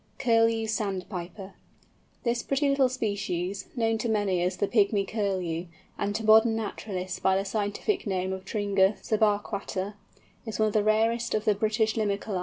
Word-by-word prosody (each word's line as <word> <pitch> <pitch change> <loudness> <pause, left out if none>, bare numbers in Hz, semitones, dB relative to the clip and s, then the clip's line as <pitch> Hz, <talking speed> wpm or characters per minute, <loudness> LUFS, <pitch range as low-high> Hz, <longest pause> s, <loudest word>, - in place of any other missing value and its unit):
CURLEW 230 -3 +3
SANDPIPER. 195 -2 -4 0.7
This 235 -1 0
pretty 275 +4 0
little 275 -2 +3
species, 200 -6 -3
known 225 -2 +1
to 235 - -1
many 205 -5 +1
as 180 +1 0
the 205 - 0
"Pygmy 200 -3 +2
Curlew," 185 -5 -2 0.3
and 205 0 -2
to 220 - -2
modern 220 +1 +6
naturalists 195 -4 -4
by 190 0 +2
the 195 - -1
scientific 210 - -1
name 190 -1 -1
of 190 0 -6
Tringa 200 -1 +2
subarquata, 205 -2 0 0.5
is 220 -2 -5
one 215 0 +3
of - - -7
the 215 - +3
rarest 225 +2 +2
of 215 - -1
the 215 - +4
British 215 +2 +1
Limicolæ. 205 -2 -1
210 Hz, 160 wpm, -27 LUFS, 195-225 Hz, 0.7 s, modern